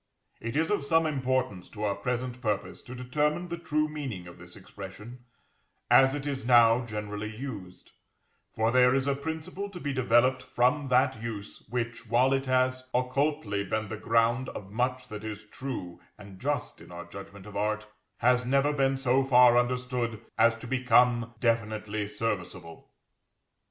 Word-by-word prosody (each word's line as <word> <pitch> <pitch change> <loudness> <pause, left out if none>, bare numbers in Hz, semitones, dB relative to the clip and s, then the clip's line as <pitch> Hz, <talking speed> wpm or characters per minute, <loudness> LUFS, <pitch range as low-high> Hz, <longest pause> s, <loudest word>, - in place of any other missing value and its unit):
It 115 +2 -5
is 160 +3 +1
of 205 - +1
some 165 +3 +3
importance 130 - -1
to 105 -1 -7
our 100 -1 +1
present 125 +2 -3
purpose 105 -4 -2
to 125 - -10
determine 150 +7 -1
the 170 - -3
true 155 -2 0
meaning 135 -12 -5
of 85 - -12
this 90 0 -11
expression, 105 +5 -10 0.7
as 135 +1 +6
it 145 -1 -5
is 140 -2 -3
now 120 0 +5
generally 105 -1 -4
used; 110 -9 -8 0.6
for 110 +1 +1
there 125 +1 +5
is 135 0 +1
a 140 - +2
principle 160 +7 -5
to 185 -3 -9
be 145 -4 -3
developed 130 0 +3
from 130 +3 +1
that 125 -3 +2
use 110 -3 -6
which, 115 0 -3
while 125 +4 +3
it 135 0 -1
has 130 0 +1
occultly 125 -4 0
been 110 +1 -2
the 110 - -4
ground 115 +4 +2
of 95 -1 -8
much 125 +3 -1
that 105 -1 -7
is 110 -1 -6
true 110 -6 -6 0.2
and 100 -2 -12
just 140 -1 -2
in - - -14
our 85 0 -7
judgment 100 0 -11
of 105 - -11
art, 105 +1 -1 0.3
has 125 +1 +3
never 140 +3 +2
been 135 -1 +2
so 135 0 +2
far 125 -2 +6
understood 125 -2 0 0.2
as 115 +1 +4
to 115 - -10
become 120 -1 +3
definitely 110 -3 -1
serviceable. 95 -6 -4
125 Hz, 165 wpm, -28 LUFS, 110-135 Hz, 0.7 s, as